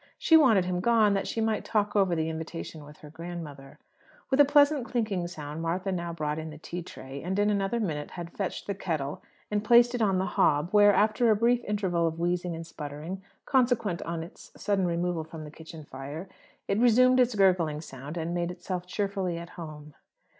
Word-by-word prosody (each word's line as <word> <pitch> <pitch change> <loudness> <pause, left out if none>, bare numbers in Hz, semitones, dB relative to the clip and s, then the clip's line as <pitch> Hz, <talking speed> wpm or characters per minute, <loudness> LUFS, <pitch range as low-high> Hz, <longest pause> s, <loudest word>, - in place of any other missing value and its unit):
She 325 - +4
wanted 230 - +6
him 180 0 -1
gone, 220 0 +4
that 195 - -1
she 225 - -2
might 220 -1 0
"talk 210 -1 0
over" 190 -4 +3
the 160 -1 -1
invitation 160 -1 -6
with 150 +1 -13
her 150 - -11
grandmother. 160 -5 -8 0.5
With 265 - +2
a 290 - +9
pleasant 290 -1 +4
clinking 215 -8 -1
sound, 155 -2 -7
Martha 180 +4 -1
now 170 -2 -3
brought 155 -2 -3
in 160 0 -6
the 155 - -10
tea 175 +3 -6
tray; 135 -4 -9
and 185 +3 -3
in 205 +1 +3
another 200 +3 0
minute 155 -9 -3
had 170 -1 -7
fetched 195 -3 -4
the 200 - -2
kettle 155 -7 -3 0.3
and 210 0 0
placed 240 +2 +6
it 245 - -2
on 195 -3 +3
the 185 - 0
hob, 150 -1 +2
where, 205 -1 +7
after 215 +4 +3
a 215 - +5
brief 235 +3 +2
interval 185 -5 0
of 160 0 -3
wheezing 175 0 -1
and 165 0 -7
sputtering, 155 +4 -7 0.2
consequent 240 - +1
on 165 -1 -4
its 170 - -13
sudden 195 -3 +1
removal 170 -1 -1
from 160 0 -9
the 150 - -9
kitchen 160 0 -11
fire, 145 +7 -7 0.4
it 195 - +1
resumed 255 +2 +5
its 250 -2 +3
gurgling 180 -6 +3
sound, 145 +1 -8
and 165 +1 -2
made 175 0 -1
itself 180 0 -5
cheerfully 195 -3 -2
at 170 0 -8
home. 150 -3 -9
180 Hz, 205 wpm, -28 LUFS, 160-210 Hz, 0.5 s, a